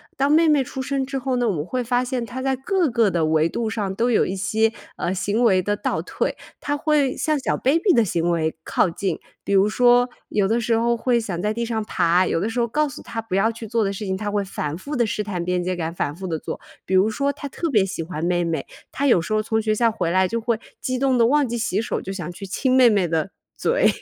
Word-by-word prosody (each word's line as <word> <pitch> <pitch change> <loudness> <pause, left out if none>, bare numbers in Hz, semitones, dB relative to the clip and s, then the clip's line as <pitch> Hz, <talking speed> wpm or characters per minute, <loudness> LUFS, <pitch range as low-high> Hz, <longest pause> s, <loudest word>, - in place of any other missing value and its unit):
当 275 +2 +1
妹 325 +2 +5
妹 295 -3 +4
出 265 +1 -6
生 275 -1 -1
之 270 0 -4
后 260 0 -1
呢， 240 -2 +1
我 - - +1
们 150 -1 -3
会 250 +5 -2
发 245 +1 +1
现 250 -2 -2
她 255 +2 -6
在 265 -1 +1
各 350 +6 0
个 230 -3 +3
的 170 -3 +1
维 155 +1 +2
度 225 +3 -2
上 205 -4 -2
都 240 +3 +1
有 - - +4
一 190 - -3
些， 220 +3 +1 0.3
呃， 175 - -1
行 205 +5 0
为 190 -5 +4
的 205 +1 0
倒 - - -2
退。 - - -2 0.2
她 290 0 -1
会 295 -3 +1
向 310 -2 +1
小 - - -1
baby 330 - +2
的 235 -6 +4
行 170 -1 0
为 160 -2 0
靠 - - +2
近， 180 0 -3 0.2
比 - - -4
如 195 +1 +5
说 245 +2 +4 0.2
有 205 -2 +1
的 230 +3 +1
时 230 0 +1
候 235 +1 +2
会 240 0 +1
想 180 -6 -4
在 210 +1 0
地 235 +1 -2
上 220 -2 -2
爬， 180 -2 +2
有 - - 0
的 200 - -1
时 245 - -2
候 235 - +2
告 300 +5 +1
诉 265 - -9
她 225 - -6
不 225 -4 -6
要 220 +4 +3
去 225 -1 -8
做 230 0 +1
的 195 - 0
事 205 +1 -5
情 190 0 -1
她 205 +1 -3
会 205 -1 0
反 150 -4 -4
复 290 +9 -6
地 240 -2 +2
试 210 0 -2
探 180 -4 -3
边 180 0 0
界 185 0 -1
感， 165 -1 -3
反 145 -3 -2
复 190 +1 -6
地 160 -2 -2
做。 - - -6 0.2
比 190 - -3
如 190 +4 +4
说 280 +6 -1
她 285 - -7
特 335 - -3
别 210 -5 +4
喜 185 -3 -4
欢 160 -1 -5
妹 175 0 +1
妹， 165 -1 -2 0.3
她 280 +1 0
有 210 - +5
时 215 +6 -3
候 215 - +2
从 220 +1 0
学 215 0 +1
校 230 +1 +2
回 175 -6 -2
来 185 0 +3
就 230 +3 -2
会 230 -1 -1 0.2
激 255 -1 -2
动 265 -2 +2
地 230 - +5
忘 285 +3 +3
记 240 0 -3
洗 220 -3 0
手 - - -2
就 195 - -6
想 175 -2 -5
去 195 +3 -8
亲 255 +7 0
妹 255 -2 +7
妹 200 -5 +2
的 160 -2 -1 0.3
嘴。 - - +2
220 Hz, 300 characters per minute, -22 LUFS, 185-250 Hz, 0.3 s, 妹